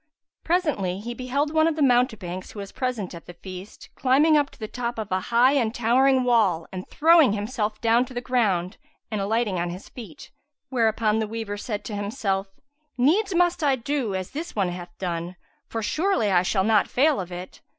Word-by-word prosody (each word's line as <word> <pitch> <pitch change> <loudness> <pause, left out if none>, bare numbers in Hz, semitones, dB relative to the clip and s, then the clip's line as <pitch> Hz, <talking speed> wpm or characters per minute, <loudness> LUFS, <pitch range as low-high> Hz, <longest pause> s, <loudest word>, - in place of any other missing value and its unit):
Presently, 290 - 0
he 235 +4 -5
beheld 270 +5 -2
one 315 0 +4
of 325 - 0
the 305 - +1
mountebanks, 220 -8 0
who - - -12
was 200 -1 -7
present 245 -8 -3
at 170 - -11
the 175 - -10
feast, 185 +2 -10
climbing 285 +5 +3
up 290 -2 +2
to - - -19
the 215 - -5
top 240 +1 -4
of 215 -3 -5
a 185 - +1
high 240 +3 +5
and 240 -6 +1
towering 255 +3 +3
wall 215 -9 +2
and 185 0 -7
throwing 320 -6 +5
himself 215 0 -2
down 230 +1 +4
to 255 - -12
the - - -1
ground 215 -7 0 0.3
and 210 -2 -1
alighting 210 -2 0
on 175 0 -1
his 180 +3 -8
feet. 220 -10 -11 0.4
Whereupon 220 -3 +1
the 220 - -1
waver 220 -2 -4
said 205 0 -5
to 210 - -5
himself, 200 -2 -2 0.5
"Needs 360 - +2
must 350 -1 +2
I 280 -2 +3
do 255 -4 -2
as 185 -1 -4
this 320 +4 -6
one 195 -4 +1
hath 175 0 -7
done, 175 -1 -4 0.3
for 225 -1 -4
surely 305 - +1
I 180 -2 +4
shall 190 +1 +1
not 210 -1 +3
fail 290 +1 +2
of 180 0 -8
it." 180 +1 -8
225 Hz, 200 wpm, -24 LUFS, 195-265 Hz, 0.5 s, high